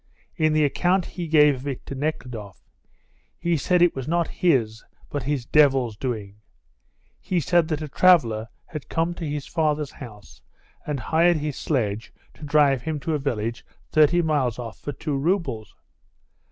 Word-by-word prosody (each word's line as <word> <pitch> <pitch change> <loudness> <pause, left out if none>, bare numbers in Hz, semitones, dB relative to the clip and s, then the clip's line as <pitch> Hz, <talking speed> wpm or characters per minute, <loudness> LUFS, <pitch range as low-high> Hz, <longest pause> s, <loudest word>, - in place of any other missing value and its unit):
In 155 -1 +2
the 155 -1 +3
account 180 +5 +1
he 175 -2 -6
gave 150 -2 +5
of 130 +1 -7
it 135 -3 -5
to - - -6
Nekhludoff, 125 - -5 0.7
he 170 0 0
said 175 +4 +2
it 175 - +4
was 135 -2 -5
not 170 +1 0
his 115 -10 +2 0.3
but 145 - -2
his 140 -5 -1
devil's 135 -6 +3
doing. 105 -4 -5 0.8
He 180 - -1
said 170 +2 +2
that 155 -1 -2
a - - -4
traveller 130 -10 +3 0.2
had 155 -2 -8
come 165 +1 0
to 165 -3 -5
his 145 -1 -4
father's 150 -3 -1
house 105 -6 -12 0.5
and 145 -2 -2
hired 165 +7 +3
his 150 -2 -3
sledge 110 -7 -2 0.2
to - - -15
drive 145 -3 +3
him 155 +2 -3
to 160 - -2
a 150 - 0
village 120 -4 -3 0.3
thirty 155 +3 +4
miles 145 -7 0
off 115 -3 -7
for 145 - -5
two 145 +1 -4
roubles. 150 - -1
145 Hz, 165 wpm, -24 LUFS, 125-160 Hz, 0.8 s, gave